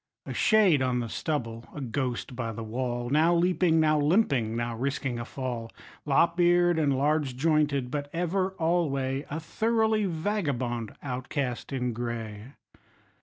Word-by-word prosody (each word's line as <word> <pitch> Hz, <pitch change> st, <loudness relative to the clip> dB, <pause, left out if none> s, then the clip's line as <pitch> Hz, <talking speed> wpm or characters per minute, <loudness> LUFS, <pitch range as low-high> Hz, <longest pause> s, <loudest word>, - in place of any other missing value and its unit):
A -, -, -5 dB
shade 200 Hz, -10 st, +4 dB
on 125 Hz, -1 st, +1 dB
the 115 Hz, -1 st, -3 dB
stubble, 115 Hz, -5 st, -3 dB
a -, -, -5 dB
ghost 125 Hz, -1 st, -3 dB
by 115 Hz, -2 st, -3 dB
the 115 Hz, +1 st, -6 dB
wall, 120 Hz, +2 st, -3 dB
Now 160 Hz, +4 st, +4 dB
leaping, 175 Hz, -1 st, +3 dB
now 155 Hz, -1 st, +3 dB
limping, 145 Hz, -, +2 dB
now 120 Hz, 0 st, -2 dB
risking 130 Hz, 0 st, -2 dB
a 120 Hz, -, -4 dB
fall, 120 Hz, -3 st, -5 dB, 0.4 s
Lop 165 Hz, +5 st, +3 dB
eared 175 Hz, -1 st, +4 dB
and 140 Hz, -4 st, +2 dB
large 145 Hz, -2 st, +1 dB
jointed, 145 Hz, -4 st, +1 dB
but 145 Hz, -1 st, -3 dB
ever 185 Hz, +3 st, -1 dB
alway 145 Hz, -6 st, 0 dB
A 150 Hz, -, -3 dB
thoroughly 220 Hz, +4 st, +1 dB
vagabond 145 Hz, -, -2 dB
outcast 130 Hz, -1 st, -3 dB
in 125 Hz, -3 st, -1 dB
gray. 115 Hz, 0 st, -5 dB
140 Hz, 145 wpm, -28 LUFS, 120-165 Hz, 0.4 s, shade